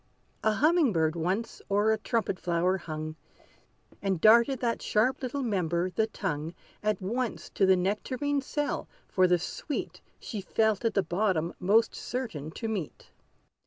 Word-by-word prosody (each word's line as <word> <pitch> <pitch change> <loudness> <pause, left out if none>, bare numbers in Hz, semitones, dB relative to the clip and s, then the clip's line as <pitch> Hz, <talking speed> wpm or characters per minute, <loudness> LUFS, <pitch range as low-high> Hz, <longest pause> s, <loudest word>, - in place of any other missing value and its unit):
A 220 - +3
humming 305 - +4
bird 160 -1 +1
once 185 +7 -2
o'er 205 +2 +3
a 220 - +2
trumpet 215 -4 -1
flower 180 +2 +1
hung, 155 -1 -6 0.8
And 195 -3 0
darted 235 - +6
that 235 -2 -1
sharp 225 +5 +1
little 265 +2 -2
member, 180 -5 0
the 220 +5 +1
tongue, 165 -6 -3 0.3
At 210 -2 0
once 235 +5 -3
to 195 - +2
the 190 - +6
nectarine 255 +10 -1
cell, 290 +2 -2 0.2
for 185 -1 +3
the 180 0 +4
sweet 275 - -5 0.2
She 210 - -5
felt 220 +2 +1
at 225 - +1
the 200 - +3
bottom 175 -3 0
most 215 +5 +3
certain 220 - -4
to 225 +8 -5
meet. 205 -8 -5
205 Hz, 155 wpm, -29 LUFS, 180-230 Hz, 0.8 s, darted